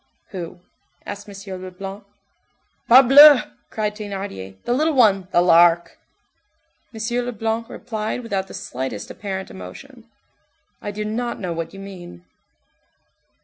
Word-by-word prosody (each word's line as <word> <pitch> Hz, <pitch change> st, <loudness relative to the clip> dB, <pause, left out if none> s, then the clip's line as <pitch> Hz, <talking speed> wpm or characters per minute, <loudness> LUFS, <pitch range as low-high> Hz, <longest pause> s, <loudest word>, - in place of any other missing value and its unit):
"Who?" 175 Hz, -2 st, -7 dB, 0.4 s
asked 205 Hz, +1 st, -8 dB
M. 195 Hz, -2 st, -8 dB
Leblanc. 195 Hz, +2 st, -8 dB, 0.9 s
"Parbleu!" 270 Hz, +3 st, +9 dB, 0.3 s
cried 210 Hz, -1 st, -2 dB
Thénardier, 195 Hz, -, -6 dB
"the 240 Hz, -, 0 dB
little 310 Hz, +4 st, +1 dB
one, 200 Hz, -7 st, +4 dB
the 175 Hz, -, +4 dB
Lark." 170 Hz, -1 st, +4 dB, 0.9 s
M. 225 Hz, -, -10 dB, 0.2 s
Leblanc 225 Hz, -1 st, -3 dB
replied 220 Hz, +2 st, -4 dB
without 195 Hz, -4 st, -3 dB
the -, -, -10 dB
slightest 130 Hz, -4 st, -5 dB
apparent 190 Hz, -2 st, -6 dB
emotion:— 90 Hz, -1 st, -11 dB, 0.8 s
"I -, -, -5 dB
do 210 Hz, +1 st, -4 dB
not 235 Hz, +3 st, -3 dB
know 180 Hz, -4 st, -3 dB
what 165 Hz, -1 st, -5 dB
you 195 Hz, -, -11 dB
mean." 175 Hz, -, -11 dB
200 Hz, 120 wpm, -21 LUFS, 180-225 Hz, 0.9 s, Parbleu